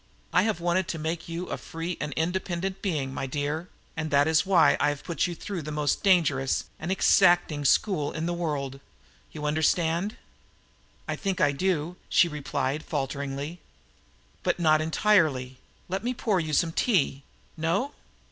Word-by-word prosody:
I - - +5
have 215 -5 0
wanted 175 +1 +1
to 165 - -3
make 160 +2 -4
you 170 +2 -4
a - - -3
free 165 +2 -5
and 145 - -3
independent 180 +3 -2
being, 145 -9 -2
my 135 - -3
dear, 150 +5 -3 0.3
and 155 -1 -3
that 145 0 +4
is 160 +4 +3
why 185 -4 +5
I - - +3
have 145 -1 -4
put 170 +1 0
you 175 - -5
through 190 +1 -5
the 150 0 -6
most 150 -1 0
dangerous 155 -9 +3 0.2
and 165 +3 -3
exacting 175 -5 +4
school 150 0 +2
in 160 0 -3
the 175 - -1
world. 145 -6 -3 0.5
You 150 -1 -6
understand?" 165 +5 +1 0.9
"I - - -1
think 195 -3 -2
I 145 - +4
do," 175 +2 -1
she 175 - +5
replied 150 -1 -2
falteringly. 140 +2 -4 0.8
"But - - 0
not 155 -2 +4
entirely. 155 -7 +2 0.3
Let 190 +3 -3
me 250 +1 -1
pour 210 -5 +1
you 155 -2 -3
some 165 +3 +2
tea? 160 - +1 0.3
No?" 170 - 0
160 Hz, 165 wpm, -27 LUFS, 145-180 Hz, 0.9 s, I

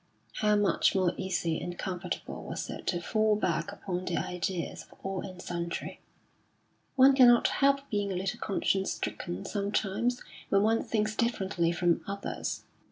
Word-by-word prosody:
How 210 -1 +3
much 205 -1 +3
more 185 -2 +3
easy 170 -3 -1
and 175 0 -5
comfortable 180 -1 -4
was - - -5
it - - -8
to 175 - +1
fall 215 +4 +2
back 195 -1 -1
upon 185 -3 -4
the 175 - -1
ideas 180 0 -3
of - - -17
all 195 -1 -3
and 185 -2 -8
sundry? 170 -1 -4 1.0
One 270 +1 +7
cannot 245 -3 +7
help 275 0 +2
being 205 -2 0
a - - -2
little 185 +1 -2
conscience 195 -1 0
stricken 175 -1 -4
sometimes 210 +4 -1 0.3
when 195 0 +4
one 225 +1 +3
thinks 215 -1 -1
differently 190 -8 +1
from 170 -1 +2
others. 200 0 -4
195 Hz, 155 wpm, -30 LUFS, 180-215 Hz, 1.0 s, One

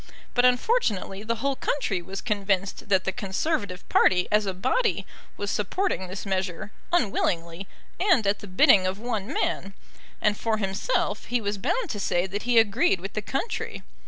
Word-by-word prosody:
But 245 0 +4
unfortunately 245 - +1
the 230 +2 -1
whole 275 +4 -1
country 220 -10 -1
was 190 +3 -6
convinced 200 -3 -1
that 190 -2 +3
the 190 - 0
Conservative 200 - -2
party 180 -1 +4
as 210 -1 +3
a 190 - -1
body 260 - 0 0.3
was 205 0 -2
supporting 210 - -1
this 190 +3 -6
measure, 190 0 -2 0.2
unwillingly, 185 - 0 0.3
and 350 - +3
at 200 +1 +1
the 205 - -9
bidding 185 0 +5
of 185 +1 -2
one 220 -3 -3
man; 195 0 -2 0.4
and, 210 -1 +2
for 220 0 -1
himself, 195 - -1
he 245 - 0
was 205 -2 -3
bound 455 - -1
to 205 - -4
say 175 -2 +1
that 205 +5 -5
he 240 - +4
agreed 205 -4 +4
with 195 +3 -7
the 215 - -2
country. 270 - -3
205 Hz, 170 wpm, -26 LUFS, 190-240 Hz, 0.4 s, bidding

